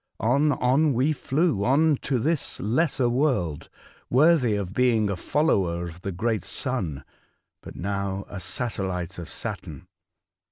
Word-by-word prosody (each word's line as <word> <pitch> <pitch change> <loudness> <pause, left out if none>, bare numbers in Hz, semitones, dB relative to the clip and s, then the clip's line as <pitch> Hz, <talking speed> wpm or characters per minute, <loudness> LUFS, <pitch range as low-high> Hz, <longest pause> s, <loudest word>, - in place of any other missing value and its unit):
On, 140 +7 +3
on 140 +4 +2
we 135 +6 +2
flew, 140 - 0
on 145 +6 +4
to 135 0 -1
this 150 +5 -1
lesser 130 - +1
world, 120 - 0 0.4
worthy 130 -4 +4
of 100 -2 -3
being 115 -4 +2
a - - -1
follower 90 - +1
of 85 +1 -9
the 100 - -3
great 110 +4 -1
Sun, 100 - -2 0.6
but - - -11
now 100 0 -3
a 100 - -7
satellite 95 -4 -3
of 85 - -7
Saturn. - - -6
120 Hz, 135 wpm, -25 LUFS, 95-140 Hz, 0.6 s, on